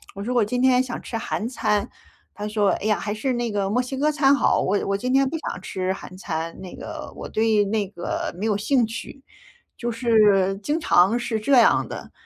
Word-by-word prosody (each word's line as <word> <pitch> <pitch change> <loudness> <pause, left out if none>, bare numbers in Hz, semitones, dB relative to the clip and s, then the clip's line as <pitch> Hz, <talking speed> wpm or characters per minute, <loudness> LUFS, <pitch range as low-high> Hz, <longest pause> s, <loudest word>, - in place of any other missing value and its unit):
我 200 - -5
说 250 +3 -2
我 240 -3 +3
今 245 +4 -2
天 255 -1 +5
想 250 -2 -4
吃 230 - -6
韩 225 0 -3
餐， 210 -5 0 0.5
他 210 0 -5
说： 210 -1 +1
“哎 - - -5
呀， 215 -2 +2
还 205 +2 -3
是 255 +4 -1
那 240 -2 -2
个 200 -1 -1
墨 245 +4 +1
西 255 +2 -5
哥 300 +3 +2
餐 280 -2 +4
好， - - +2
我 200 +2 +1
我 200 - 0
今 250 +5 -2
天 270 0 +3
不 325 - -3
想 240 - -5
吃 185 0 -2
韩 185 -1 -10
餐， 165 -2 -4
那 185 -2 -9
个 - - -8
我 - - -7
对 220 -1 +2
那 205 -1 -1
个 175 -3 -4
没 215 - -1
有 210 -2 +1
兴 240 +3 +2
趣。 230 +4 -8 0.6
“就 240 0 -3
是 210 -5 +3
经 305 +7 0
常 200 - +4
是 225 -2 -2
这 275 +6 0
样 240 -3 +5
的， - - -8
220 Hz, 240 characters per minute, -23 LUFS, 200-250 Hz, 0.6 s, 天